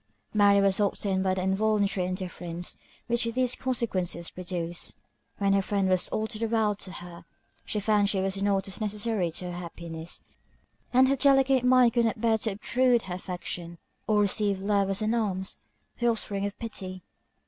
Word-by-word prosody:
Mary 205 -1 +5
was 195 0 +3
often 200 -1 0
hurt 190 - +1
by 190 -1 +2
the 185 - -2
involuntary 200 -1 +1
indifference 180 -2 -5 0.3
which 235 0 +1
these 250 +2 +1
consequences 190 -9 -1
produced. 175 -2 -4 0.4
When 200 -1 +2
her 195 - +4
friend 195 0 0
was 185 -1 +2
all 215 - -1
the 220 0 -5
world 215 -2 +1
to 185 - -6
her, 175 -1 -10 0.4
she 210 - -2
found 205 -1 +2
she 200 - +1
was 195 +1 -1
not 195 -1 +1
as 195 +3 -6
necessary 210 -3 0
to 180 +1 -4
her 175 - -6
happiness; 170 -1 -7 0.7
and 255 +1 +5
her 275 - +3
delicate 270 -1 +4
mind 250 -1 +5
could 235 -2 +3
not 225 - -1
bear 225 -1 +2
to 215 -1 -1
obtrude 245 +3 +2
her 185 - -5
affection, 175 -1 -6 0.3
or 215 -1 +3
receive 200 -1 +1
love 200 -1 +2
as 195 +2 0
an 215 +2 +1
alms, 195 -5 -1 0.4
the 240 - +2
offspring 205 -3 -1
of 205 - -8
pity. 185 -5 -6
200 Hz, 180 wpm, -28 LUFS, 185-225 Hz, 0.7 s, Mary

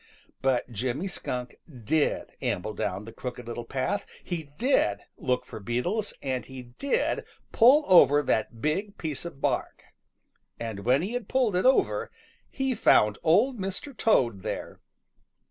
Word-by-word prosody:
But 130 -2 +1
Jimmy 125 - -2
Skunk 125 -9 -5
did 140 +4 0
amble 105 +4 -2
down 100 +1 -3
the 115 - -9
Crooked 125 0 -7
Little 120 0 -5
Path, 135 +12 -1 0.2
he 170 -3 -4
did 220 - +2
look 125 -1 -1
for - - -8
beetles, 150 - -1
and 130 -2 -2
he 130 -1 -9
did 275 - -1 0.3
pull 270 +6 +6
over 145 -5 +7
that 115 -2 -1
big 195 +7 -1
piece 155 -2 -4
of 140 -5 -8
bark. - - -1 0.8
And 110 -4 -5
when 130 +6 +3
he 205 +6 -3
had 245 -2 -4
pulled 250 -7 +2
it 180 - +1
over, 260 - +2 0.4
he 265 -1 -1
found 105 - +4
Old 220 +10 +3
Mr. 195 +8 -4
Toad 120 - +2
there. 110 - -5
140 Hz, 145 wpm, -27 LUFS, -, 0.8 s, over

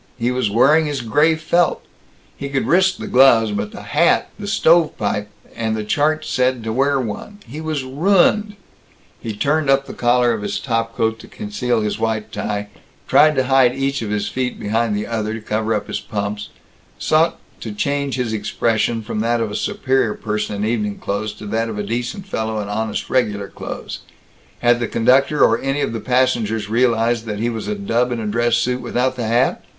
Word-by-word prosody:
He 120 0 0
was 125 -4 0
wearing 150 +9 +4
his 145 -3 -2
gray 150 +8 +3
felt. 170 +2 +1 0.5
He 140 - -6
could 135 -1 -1
risk 190 +2 +3
the - - -6
gloves, 120 -4 +5
but 105 0 -3
the - - -9
hat - - +2
the 205 - -6
"stovepipe" 160 - +2 0.3
and 110 -1 -1
the 110 - -3
chart 150 +8 +1
had - - -10
said 130 -4 0
to 110 0 -3
wear 135 +3 +2
one 125 - -5
he 145 +7 -7
was 155 -3 -2
ruined 195 +9 +2 0.6
He 110 -2 -5
turned 145 +5 +1
up 135 0 +3
the - - -8
collar 120 0 +2
of 110 - -4
his 105 - -3
top 115 -2 -2
coat 110 0 0
to - - -12
conceal 125 - -2
his 105 -1 -2
white 110 -1 -2
tie, 105 -1 -3 0.4
tried 155 0 +5
to 130 - +2
hide 130 -1 +4
each 135 0 -1
of 110 - -4
his 105 -1 -1
feet 125 -1 -3
behind 110 +1 0
the 105 +1 -2
other 110 -1 -2
to - - -5
cover 110 +1 -1
up 105 - -2
his - - -4
pumps; 105 0 -4 0.5
sought 160 +2 +2 0.2
to 110 - -6
change 140 +5 -1
his 125 -3 -2
expression 110 +1 0
from 105 - -4
that 115 +2 +1
of 115 -2 -2
a - - -5
superior 135 - 0
person 105 -1 -3
in 100 +1 -2
evening 105 -2 -1
clothes 105 +2 -3
to 105 - -11
that 115 +2 -1
of 110 - -5
a 105 - -2
decent 120 - -4
fellow 110 - -3
in 105 - -4
honest 110 +1 -2
Regular 105 -6 0
Clothes. - - -7 0.6
Had 120 0 +4
the 120 - -1
conductor 130 +7 +3
or - - +4
any 135 +2 -1
of - - -1
the 115 - -3
passengers 115 -4 0
realized 115 -1 +2
that 105 -2 -4
he 115 +3 -1
was 110 -2 -5
a 105 - -1
dub 115 +5 0
in 120 - -2
a 110 - -4
dress 115 +2 +1
suit 125 +1 0
without 130 +1 -1
the 120 -3 -3
hat? 120 +3 +1
120 Hz, 205 wpm, -20 LUFS, 110-135 Hz, 0.6 s, gloves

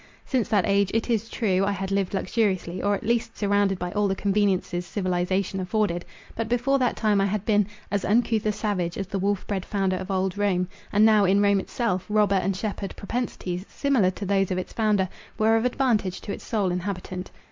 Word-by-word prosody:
Since 250 -7 0
that 205 -4 +3
age, 200 -1 +2
it 230 +2 0
is 225 0 0
true, 195 -5 +1
I 200 +1 +1
had 195 0 -4
lived 195 -1 0
luxuriously, 190 -4 0
or 205 0 +2
at - - -6
least 230 0 0
surrounded 200 -2 +2
by 180 0 -4
all 210 +1 +1
the 195 - 0
conveniences 190 -3 0
civilization 185 +1 -1
afforded. 185 -2 -1 0.3
But 225 -1 -3
before 245 +3 +2
that 250 -2 +1
time, 210 -3 +2
I 195 - +2
had 205 +1 -2
been 210 -3 +3 0.2
"as 200 -1 0
uncouth 220 0 +2
a - - +3
savage, 200 -5 -2
as 195 - -2
the 195 +1 -3
wolf 200 0 0
bred 195 -3 -2
founder 195 -2 0
of 185 +1 -6
old 190 0 -1
Rome"—and 200 +2 +1
now, 215 -2 +5
in 195 +2 +4
Rome 200 -1 +4
itself, 190 -2 -1
robber 210 -1 +3
and 195 0 +1
shepherd 200 -1 -4
propensities, 200 -5 -3
similar 265 -10 +2
to 200 +2 -5
those 195 -1 +1
of 185 - -1
its 185 - -5
founder, 210 -4 +2 0.3
were 220 +1 +4
of 225 +1 +1
advantage 240 -7 +1
to 200 - -5
its - - -8
sole 205 -5 0
inhabitant. 180 0 -4
200 Hz, 205 wpm, -25 LUFS, 185-215 Hz, 0.3 s, now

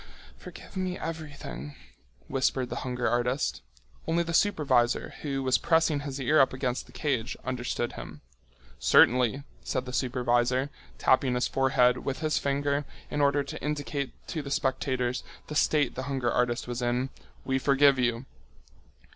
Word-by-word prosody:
"Forgive - - -12
me 185 -1 -2
everything," 145 - -6 0.5
whispered 130 -2 0
the - - -3
hunger 125 -1 -2
artist. 120 - 0 0.5
Only 170 +1 +2
the 170 0 -4
supervisor, 135 - +2
who 135 -2 -2
was 130 -1 +3
pressing 160 -2 +3
his 140 -1 -5
ear 145 +4 +3
up 135 - +4
against 130 -1 -2
the - - -16
cage, 130 -7 -2
understood 125 -1 -2
him. - - -9 0.6
"Certainly," 125 +2 +4 0.2
said 130 -2 -2
the 125 - -7
supervisor, 125 +1 +1 0.3
tapping 130 - +3
his 125 - +1
forehead 130 -2 +3
with 135 +3 -4
his 155 -1 +1
finger 140 +1 0 0.3
in 145 - 0
order 140 0 +3
to 155 +2 -7
indicate 145 -2 -2 0.2
to 160 - -2
the 140 - -7
spectators 130 -2 0 0.2
the 150 - -7
state 145 -3 +2
the 130 - -4
hunger 130 -3 0
artist 125 -1 0
was 120 0 -3
in, 125 +2 0 0.3
"we 130 0 +1
forgive 140 0 +4
you." 120 0 0
130 Hz, 150 wpm, -28 LUFS, 125-145 Hz, 0.6 s, up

